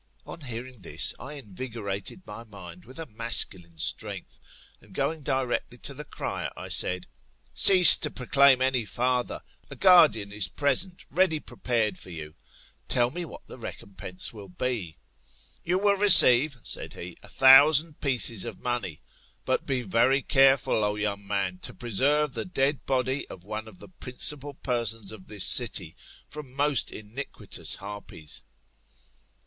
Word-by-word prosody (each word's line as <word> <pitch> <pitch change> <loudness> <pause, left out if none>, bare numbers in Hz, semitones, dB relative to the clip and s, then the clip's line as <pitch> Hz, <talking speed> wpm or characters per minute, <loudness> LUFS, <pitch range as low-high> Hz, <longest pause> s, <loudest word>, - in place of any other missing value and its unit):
" - - -29
On - - -11
hearing 125 -1 -8
this, - - 0
I 140 - -9
invigorated 115 - -8
my 105 +3 -11
mind 90 -5 -13
with 130 +3 -14
a 165 - -6
masculine 105 - -2
strength, - - -3 0.4
and - - -20
going 160 -1 -3
directly 130 -2 -4
to 140 - -9
the 145 +2 -10
cryer, - - -6
I - - -9
said, 90 0 +1 0.5
Cease 185 -3 +11
to 150 - +1
proclaim 135 0 +2
any 130 -2 -1
forther, 125 +4 -3 0.3
a - - -9
guardian 160 - +4
is 105 -1 +1
present 150 +6 -2
ready 180 -4 0
prepared 115 -5 -4
for - - -12
you; 80 -3 -10 0.5
tell 120 0 0
me 175 +3 -6
what - - -14
the - - -13
recompense 95 0 -8
will 100 -3 -13
be. 100 -5 -5 0.7
You 180 +2 -1
will 200 +1 +1
receive, 145 -9 +7
said - - -5
he, 85 0 -10
a - - -14
thousand 145 +4 +4
pieces 120 -6 +1
of - - -9
money. 120 -10 -5 0.4
But - - -2
be 130 -2 -2
very 120 +6 0
careful, 135 -5 +2
O 105 0 -2
young 100 -1 -5
man, 95 -3 -4
to - - -9
preserve 135 +6 -1
the 115 - -4
dead 145 -5 -3
body 130 +1 -2
of 90 - -13
one 110 +2 -8
of 105 -4 -15
the - - -15
principal 145 -2 -5
persons 115 -6 -3
of 105 -4 -14
this 105 -4 -1
city 95 -6 +2 0.3
from 140 -3 -11
most 145 -2 0
iniquitous 110 +7 -4
harpies. 100 -6 -8
125 Hz, 155 wpm, -25 LUFS, 105-140 Hz, 0.7 s, Cease